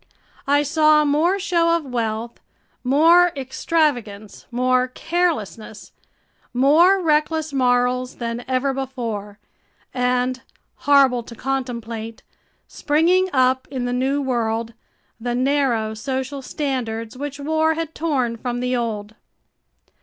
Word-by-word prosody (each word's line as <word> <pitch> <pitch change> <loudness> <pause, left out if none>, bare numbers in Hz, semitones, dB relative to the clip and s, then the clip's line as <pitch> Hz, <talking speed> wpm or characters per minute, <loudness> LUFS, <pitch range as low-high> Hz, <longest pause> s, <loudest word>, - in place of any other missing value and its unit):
I 285 +1 +3
saw 305 0 +4
more 315 +7 +2
show 340 -4 +2
of 325 - -8
wealth, 230 -2 -3 0.4
more 330 +7 +5
extravagance, 255 -7 -2
more 255 +1 +1
carelessness, 255 - -3 0.6
more 320 +9 +5
reckless 310 -2 0
morals 250 -1 +1
than 235 0 -4
ever 260 +1 0
before, 230 -6 -5 0.6
and 250 0 0 0.4
horrible 275 -4 +4
to 235 0 -12
contemplate 235 -3 -4 0.4
springing 350 +5 +2
up 260 -1 +2
in 255 -3 -3
the 245 - -2
new 270 +3 0
world, 230 -3 -1 0.5
the 240 +1 -2
narrow 255 -4 +1
social 265 +4 -4
standards 250 -5 -4
which 285 +1 -6
war 315 +2 +1
had 325 -1 -4
torn 260 -8 -1
from 245 +1 -3
the 250 +1 -1
old. 215 -3 -3
260 Hz, 110 wpm, -21 LUFS, 240-300 Hz, 0.6 s, more